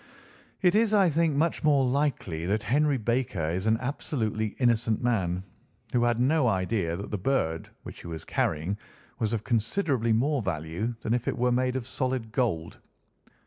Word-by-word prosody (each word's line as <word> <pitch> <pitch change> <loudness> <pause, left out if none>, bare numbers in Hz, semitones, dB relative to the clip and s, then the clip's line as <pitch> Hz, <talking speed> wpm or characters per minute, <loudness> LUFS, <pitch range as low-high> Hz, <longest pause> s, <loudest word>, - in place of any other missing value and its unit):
"It 180 - +5
is, 215 0 +3
I 195 -3 +5
think, 160 -1 +2
much 160 +3 +1
more 145 -3 +4
likely 125 - -1
that 105 +3 0
Henry 145 +4 +2
Baker 110 -8 -1
is 95 +5 -2
an 110 +1 +4
absolutely 110 -5 -2
innocent 115 -2 +2
man, 95 -7 0 0.5
who 120 - +3
had 120 -1 +2
no 135 +3 +3
idea 95 -4 0
that 100 +4 -6
the 105 - -2
bird 85 -8 0
which - - -9
he - - -9
was 80 -2 -6
carrying 85 +7 -1 0.4
was 110 -3 0
of 110 -2 -1
considerably 120 - 0
more 135 +5 +2
value 90 +5 -3
than 110 - 0
if 120 -1 -1
it - - -1
were 125 0 +2
made 125 +1 +1
of 130 -3 -2
solid 130 -3 -2
gold. 110 -10 -1
115 Hz, 175 wpm, -27 LUFS, 100-135 Hz, 0.5 s, It